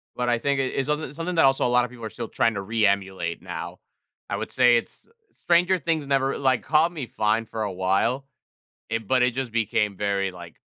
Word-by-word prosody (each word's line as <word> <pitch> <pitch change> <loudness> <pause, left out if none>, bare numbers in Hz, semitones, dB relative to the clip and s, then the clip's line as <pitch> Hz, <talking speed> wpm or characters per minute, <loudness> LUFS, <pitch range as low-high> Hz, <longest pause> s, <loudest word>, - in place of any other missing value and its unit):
But 125 0 -1
I 120 - +3
think 140 +2 0
i - - +2
it's 135 0 -2
some 150 -2 -2
something 165 +3 -4
that 160 - +5
also 135 0 +3
a - - +2
lot 125 0 +3
of - - -8
people 120 -2 -9
are - - -4
still 115 +1 -6
trying 115 +1 +1
to 100 - -2
re-emulate 100 -4 0
now. - - -7 0.5
I - - -1
would - - -5
say 125 -2 +5
it's 115 - -6 0.2
Stranger 180 +2 +2
Things 160 -2 -1
never 135 -1 +1
like, 130 -3 +1
caught 155 +3 +3
me 150 -8 -6
fine 110 +1 0
for 110 0 -4
a 105 - -2
while. 95 +9 0 0.6
It 115 -1 -3
but 130 -1 +3
it 125 0 +3
just 130 -1 -3
became 105 -3 0
very, 100 -1 0
like, 85 -2 -12
120 Hz, 225 wpm, -25 LUFS, 105-135 Hz, 0.6 s, that